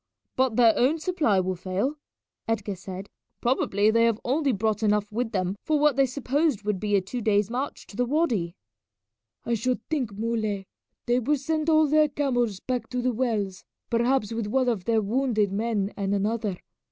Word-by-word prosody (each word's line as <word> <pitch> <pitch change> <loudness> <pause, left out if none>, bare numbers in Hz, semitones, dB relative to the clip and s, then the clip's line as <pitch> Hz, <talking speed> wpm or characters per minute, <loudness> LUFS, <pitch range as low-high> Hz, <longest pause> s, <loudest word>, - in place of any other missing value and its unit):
"But 260 -3 +1
their 230 -2 +6
own 270 +6 +3
supply 310 - +1
will 185 0 0
fail," 190 - -2 0.5
Edgar 215 -3 -1
said. 190 +1 -8 0.3
"Probably 215 -4 +2
they 230 +1 +4
have 230 -2 +1
only 280 +2 +1
brought 215 0 0
enough 210 -1 +1
with 225 +1 -2
them 185 -1 -1
for 310 - +1
what 300 -2 +4
they 275 0 +3
supposed 280 -1 0
would 210 -2 -1
be 205 0 0
a 195 - +3
two 235 +6 -5
days' 210 -1 +2
march 260 +4 -4
to - - -14
the 245 +2 0
wady." 235 - 0 0.9
"I 235 - 0
should 240 +1 -1
think, 265 -9 0
Muley, 215 -3 -1 0.4
they 245 0 +2
will 290 +5 +1
send 310 +3 -1
all 315 -1 +5
their 305 +1 +4
camels 245 -8 0
back 245 -1 -3
to 250 0 -2
the 255 0 +1
wells, 215 -6 -1 0.3
perhaps 235 -1 +1
with 225 -2 -2
one 255 +3 +2
of 205 -6 -2
their 225 -1 +2
wounded 220 -2 +1
men 210 -1 -1
and 200 0 -1
another. 210 -1 -1
230 Hz, 185 wpm, -26 LUFS, 205-260 Hz, 0.9 s, their